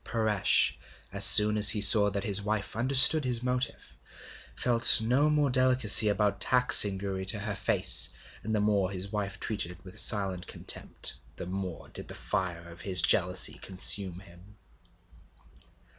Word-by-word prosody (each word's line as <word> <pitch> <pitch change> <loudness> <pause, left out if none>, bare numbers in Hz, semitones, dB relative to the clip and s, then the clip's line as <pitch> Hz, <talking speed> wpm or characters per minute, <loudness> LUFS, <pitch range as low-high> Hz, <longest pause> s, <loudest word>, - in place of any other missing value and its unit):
Paresh, 110 -4 -2 0.3
as - - -1
soon 105 0 +5
as 105 0 +5
he 105 - +3
saw 105 0 +6
that 100 0 -8
his 100 -1 -4
wife 105 0 -7
understood 135 +6 +3
his 125 -2 -4
motive, 125 0 -7 0.6
felt 120 -2 +4
no 125 +7 -3
more 150 -3 -3
delicacy 130 -4 +4
about 105 -1 -4
taxing 125 -6 +3
Gouri 95 -1 -8
to 105 - 0
her 105 0 -5
face; - - +1 0.3
and 110 +1 -7
the - - -3
more 100 -3 -3
his 100 +1 -9
wife 100 -2 -8
treated 100 -5 -7
it 90 +2 -20
with 95 - -9
silent 95 -4 -1
contempt, - - -3 0.2
the - - -11
more 95 -1 -10
did - - -10
the - - -10
fire 85 -3 -8
of 85 0 -16
his 95 -2 -2
jealousy - - 0
consume 95 -1 +1
him. 95 +3 -22
105 Hz, 160 wpm, -24 LUFS, 95-115 Hz, 0.6 s, saw